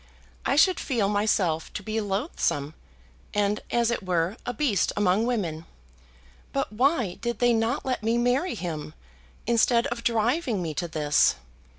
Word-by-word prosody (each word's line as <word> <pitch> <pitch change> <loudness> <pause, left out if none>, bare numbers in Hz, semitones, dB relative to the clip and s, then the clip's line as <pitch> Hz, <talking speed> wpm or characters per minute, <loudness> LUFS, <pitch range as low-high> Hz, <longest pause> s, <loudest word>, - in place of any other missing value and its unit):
I - - +2
should 360 +4 +4
feel 230 -8 0
myself 200 -6 +1
to 205 - -5
be 220 +2 -2
loathsome, 195 - -1 0.6
and, 205 0 +1
as 235 -1 +2
it 235 - -1
were, 180 0 0
a - - 0
beast 235 - +1
among 205 +3 +2
women. 170 -10 -2 0.9
But 275 -5 -2
why 245 - +1
did 235 -1 -2
they 240 +1 +3
not 225 +4 0
let 255 -3 -1
me 225 +2 +1
marry 250 +8 +1
him, 160 - -5 0.5
instead 235 +1 +3
of 235 -1 -4
driving 235 - +1
me 165 -3 -3
to 175 +4 -3
this? 150 -2 +2
220 Hz, 155 wpm, -26 LUFS, 185-240 Hz, 0.9 s, should